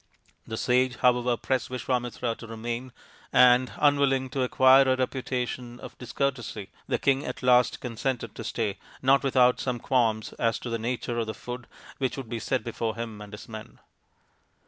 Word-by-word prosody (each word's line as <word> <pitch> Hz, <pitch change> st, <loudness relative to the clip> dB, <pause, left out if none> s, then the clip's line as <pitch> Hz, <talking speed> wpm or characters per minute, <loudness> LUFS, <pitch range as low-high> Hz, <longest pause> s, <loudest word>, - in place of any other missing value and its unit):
The 110 Hz, -, -4 dB
sage, 125 Hz, +1 st, +2 dB
however, 125 Hz, 0 st, +2 dB
pressed 130 Hz, -1 st, -1 dB
Visvamitra 125 Hz, -2 st, -2 dB
to 115 Hz, -, -10 dB
remain, 120 Hz, +3 st, -5 dB, 0.4 s
and, 125 Hz, 0 st, +5 dB
unwilling 140 Hz, -3 st, +2 dB
to 135 Hz, -, -1 dB
acquire 130 Hz, +1 st, +6 dB
a -, -, +4 dB
reputation 125 Hz, -1 st, -3 dB
for -, -, -9 dB
discourtesy, 125 Hz, -5 st, -3 dB, 0.2 s
the -, -, +1 dB
king 135 Hz, 0 st, +1 dB
at 150 Hz, -, -6 dB
last 125 Hz, -1 st, +4 dB
consented 125 Hz, +1 st, -3 dB
to -, -, -7 dB
stay, 105 Hz, -4 st, -2 dB, 0.2 s
not 135 Hz, +1 st, +5 dB
without 125 Hz, -2 st, +3 dB
some 125 Hz, -2 st, -1 dB
qualms 115 Hz, -3 st, 0 dB
as 115 Hz, -1 st, +1 dB
to 120 Hz, -, -6 dB
the 115 Hz, -, -1 dB
nature 120 Hz, 0 st, -2 dB
of 115 Hz, -, -1 dB
the 110 Hz, -, -4 dB
food 125 Hz, +2 st, -7 dB, 0.3 s
which 130 Hz, -1 st, -1 dB
would 130 Hz, -4 st, -6 dB
be 115 Hz, -, -3 dB
set 130 Hz, 0 st, -1 dB
before 115 Hz, -1 st, -3 dB
him 115 Hz, -2 st, -6 dB
and 105 Hz, -1 st, -10 dB
his 105 Hz, -, -10 dB
men. 110 Hz, -1 st, -9 dB
125 Hz, 170 wpm, -27 LUFS, 115-130 Hz, 0.4 s, acquire